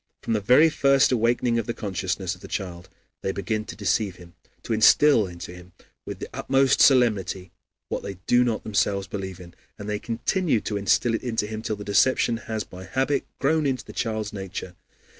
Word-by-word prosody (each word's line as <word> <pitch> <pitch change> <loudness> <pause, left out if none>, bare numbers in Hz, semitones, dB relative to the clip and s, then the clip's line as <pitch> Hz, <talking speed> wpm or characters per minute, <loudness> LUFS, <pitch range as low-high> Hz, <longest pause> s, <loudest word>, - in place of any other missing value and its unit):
From - - -1
the 105 - 0
very 130 +10 +5
first 140 -2 +3
awakening 120 0 +2
of 115 - -4
the 120 - -3
consciousness 95 -2 -3
of 90 - -14
the - - -9
child 90 -3 -5 0.3
they 95 - -1
begin 105 +3 -3
to 110 - -8
deceive 100 -1 0
him, 85 -1 -15 0.3
to 115 - -2
instill 110 +1 +5
into 85 0 -9
him 90 0 -14 0.3
with - - -5
the - - -6
utmost 135 0 +2
solemnity 105 -8 +3 0.4
what - - -3
they 100 - -6
do 125 0 +4
not 115 -3 -1
themselves 100 -2 0
believe 95 -2 -6
in, 85 -1 -12 0.2
and 105 - -8
they 105 -1 -2
continue 120 - 0
to 105 - -4
instill 100 +4 +2
it 115 - -1
into 115 -4 -1
him 110 +1 -5
till 110 - -2
the 105 - -8
deception 115 +3 +2
has 110 -2 -4
by 90 0 -11
habit 135 +3 -1
grown 155 +1 +1
into 130 -3 -2
the - - -11
child's 110 -3 -3
nature. 95 -2 -6
110 Hz, 195 wpm, -25 LUFS, 95-120 Hz, 0.4 s, very